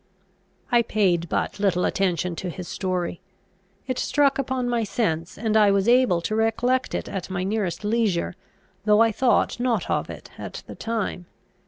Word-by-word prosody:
I 240 -1 +5
paid 185 -7 +1
but - - -1
little 190 -3 +2
attention 180 -2 0
to 185 - -4
his 175 +1 -7
story. 180 -2 -3 0.6
It 255 -1 -2
struck 280 -2 +2
upon 260 -2 -1
my 240 -1 +1
sense, 185 -5 -2
and 220 -1 -1
I 210 -2 +6
was 200 +1 +2
able 240 -8 +4
to 215 +6 -2
recollect 245 +3 +1
it - - -3
at 195 -2 -5
my 185 -1 -2
nearest 195 -3 -2
leisure, 210 -6 0 0.5
though 210 0 +4
I 230 0 +5
thought 240 +2 +2
not 240 -6 0
of - - 0
it - - -9
at - - -7
the - - -9
time. 215 -6 -3
210 Hz, 170 wpm, -24 LUFS, 180-235 Hz, 0.6 s, I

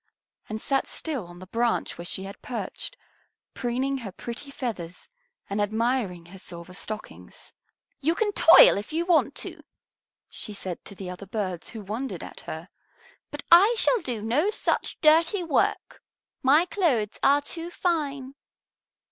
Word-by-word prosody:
and 215 0 -3
sat 270 +4 0
still 275 - -2
on 175 0 -12
the 185 - -10
branch 230 +4 0
where 170 - -8
she 190 - -2
had 195 +1 -9
perched, 255 - -5 0.6
preening 260 +3 -1
her 215 -6 -6
pretty 235 +8 -7
feathers 210 -11 -5 0.4
and 200 +1 -1
admiring 220 -4 0
her 190 +3 -12
silver 170 0 -10
stockings. 215 +3 -8 0.5
"You 320 +4 +1
can 430 0 +1
toil 330 - +8
if 210 - -8
you 330 +2 0
want 345 -3 +3
to," - - -8 0.7
she 210 - -4
said 185 -3 -6
to 200 - -10
the 185 -1 -6
other 185 +2 -9
birds 185 -4 -3
who 220 -3 -8
wondered 210 -2 -4
at - - -9
her, 160 +3 -7 0.6
"but 290 -1 -6
I 395 +8 +8
shall 470 0 +3
do 235 -5 -4
no 275 - +2
such 425 - -1
dirty 330 +5 +5
work. 325 -4 0 0.4
My 295 +6 +5
clothes 280 - 0
are 285 +1 +4
too 330 +3 -5
fine." 285 -7 -1
240 Hz, 155 wpm, -26 LUFS, 195-310 Hz, 0.7 s, toil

